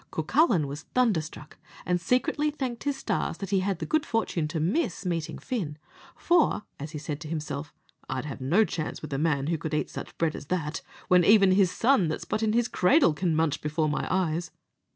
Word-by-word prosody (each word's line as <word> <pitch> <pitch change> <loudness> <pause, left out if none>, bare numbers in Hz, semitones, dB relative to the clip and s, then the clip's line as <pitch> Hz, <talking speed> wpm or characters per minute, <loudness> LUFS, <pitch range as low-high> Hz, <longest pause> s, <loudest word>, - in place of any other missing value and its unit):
Cucullin 180 - +2
was 140 +2 -6
thunderstruck, 170 -11 0 0.3
and 180 -1 0
secretly 255 - +1
thanked 260 -5 -4
his 285 -1 0
stars - - -2
that 195 0 -6
he 195 - +3
had 190 -1 -1
the - - -4
good 310 -1 +1
fortune 225 - -1
to 160 +1 -3
miss 185 - -1
meeting 170 -3 -2
Fin, 185 - -4 0.4
for, 340 -10 +2 0.2
as 145 +3 -5
he - - -4
said 150 0 -5
to 160 - -7
himself, 150 -1 -4 0.4
I'd 130 +2 -3
have 140 -2 -6
no 175 +12 +3
chance 160 -4 -4
with 155 - -5
a 135 - -1
man 150 -3 +1
who 165 +1 -1
could 155 0 -3
eat - - -1
such - - -8
bread 165 -2 0
as 145 - -8
that, 165 -3 -2 0.3
which 180 -2 +5
even 200 -3 +6
his 190 -1 +4
son 230 -2 +3
that's 155 - -3
but 215 - -2
in 215 -1 +1
his 235 0 +2
cradle 245 - +4
can 165 +1 0
munch 155 -2 +1
before 155 +1 0
my 150 - -2
eyes. 175 -2 0
170 Hz, 210 wpm, -27 LUFS, 155-220 Hz, 0.4 s, even